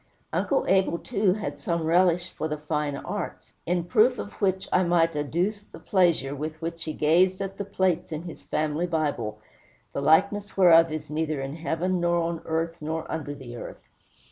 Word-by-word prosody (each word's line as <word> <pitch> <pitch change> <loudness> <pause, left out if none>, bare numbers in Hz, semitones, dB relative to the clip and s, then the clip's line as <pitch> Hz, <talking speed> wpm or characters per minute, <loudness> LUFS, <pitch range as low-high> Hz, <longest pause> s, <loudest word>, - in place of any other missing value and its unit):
Uncle - - +1
Abel, 190 -3 +3
too, 200 -2 +1
had 145 -9 -5
some 170 +3 -1
relish 175 +1 +3
for 155 - -3
the 150 -1 -3
fine 150 -1 -2
arts; - - -6
in 175 0 +1
proof 235 +7 +3
of 205 - -5
which, 190 -1 +1
I 180 - +5
might 170 -2 +2
adduce 175 +8 -1
the 205 - -14
pleasure 170 -8 +2
with 155 +2 -5
which 165 0 -5
he 155 - -3
gazed 180 +5 +3
at 195 0 -5
the 200 - -2
plates 185 -4 0
in 155 +1 -4
his 170 -2 -9
family 155 +3 -1
Bible, 145 -10 -1 0.6
the - - -2
likeness 200 +8 +2
whereof 165 -3 +7
is 155 -1 -5
neither 155 -1 -1
in 135 +2 -4
heaven, 170 +3 -1
nor 175 0 +2
on 170 0 -2
earth, 165 +1 -2
nor 160 +1 -3
under 145 -2 -4
the 125 -4 -9
earth. - - -9
165 Hz, 185 wpm, -26 LUFS, 155-185 Hz, 0.6 s, whereof